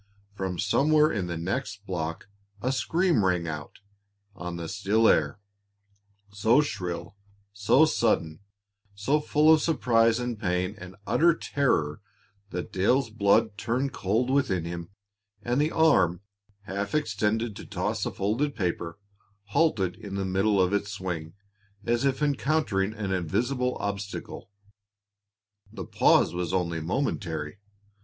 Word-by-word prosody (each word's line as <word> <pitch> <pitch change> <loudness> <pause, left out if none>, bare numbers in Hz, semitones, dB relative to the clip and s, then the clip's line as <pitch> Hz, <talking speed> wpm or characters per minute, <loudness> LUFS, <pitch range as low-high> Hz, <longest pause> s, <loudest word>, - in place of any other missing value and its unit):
From 95 -3 -4
somewhere 150 - +3
in 95 -5 -2
the 85 -1 -4
next 105 +3 -4
block 80 -3 -4 0.3
a 130 +5 -1
scream 165 - +1
rang 90 -2 +1
out 75 +2 -7 0.5
on 90 -1 -6
the 85 -1 -5
still 105 +4 +2
air, 75 +5 +2 0.9
so 110 +6 +3
shrill, 90 - -3 0.4
so 105 +9 +4
sudden, 95 - 0 0.6
so 135 +10 +1
full 150 +1 +4
of 155 - +3
surprise 115 -7 +2
and 120 -3 -3
pain 90 -1 -1
and 95 0 -10
utter 170 0 +4
terror 80 - 0 0.5
that 90 -2 -5
Dale's 115 +6 +2
blood 105 0 +2
turned 130 +3 -1
cold 115 +7 0
within 100 -12 +1
him, 85 0 -6 0.5
and 120 +4 +1
the 150 - +2
arm, 95 - +3 0.4
half 100 +2 -3
extended 110 -4 0
to - - -9
toss 105 +2 -2
a - - -1
folded 120 +9 -1
paper, 85 -2 -3 0.5
halted 105 - +1
in 100 -2 -8
the 100 -1 -2
middle 95 +2 +1
of 90 +1 +2
its 100 0 0
swing, 90 -4 -5 0.5
as 120 +2 +1
if 135 +2 0
encountering 140 -9 +1
an 100 -3 -3
invisible 120 - -1
obstacle. 100 0 -5 1.2
The 95 -5 -7
pause - - +3
was 90 -1 -3
only 85 -3 -1
momentary. 85 - -3
100 Hz, 135 wpm, -27 LUFS, 90-125 Hz, 1.2 s, so